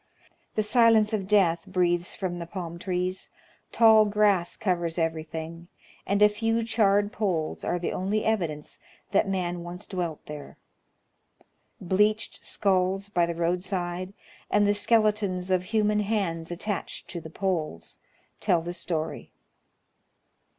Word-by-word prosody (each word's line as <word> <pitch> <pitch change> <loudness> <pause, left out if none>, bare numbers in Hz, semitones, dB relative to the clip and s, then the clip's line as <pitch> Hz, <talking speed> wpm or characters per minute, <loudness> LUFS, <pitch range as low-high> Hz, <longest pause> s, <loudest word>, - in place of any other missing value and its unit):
The 215 - +2
silence 220 -1 +4
of 195 -3 -1
death 180 -5 +3
breathes 175 -2 0
from 180 -3 -3
the 170 - -6
palm 170 -2 -6
trees, 185 0 -2 0.4
tall 220 -2 +6
grass 205 -4 +2
covers 175 -4 -1
every 165 -1 0
thing, 165 +2 -7 0.4
and 200 +1 +3
a - - +9
few 225 +2 0
charred 205 -2 +2
poles 180 -9 -2
are - - 0
the 175 - -2
only 205 +3 -1
evidence 170 -9 -2 0.3
that 195 0 +2
man 180 -2 -2
once 175 +1 -6
dwelt 175 -5 -4
there. 150 -1 -9 1.2
Bleached 210 +4 +1
skulls 195 0 0
by 175 -4 +2
the 170 - -2
I'oadside, 180 +1 -2 0.4
and 205 0 +3
the 205 - +4
skeletons 205 -4 +1
of 185 -1 +2
human 210 0 +1
hands 195 -6 -1
attached 190 +3 -4
to 170 - -5
the 160 - -9
poles, 165 - -3 0.4
tell 175 -5 +2
the 175 - -4
siory. 165 -2 -4
185 Hz, 135 wpm, -27 LUFS, 170-210 Hz, 1.2 s, a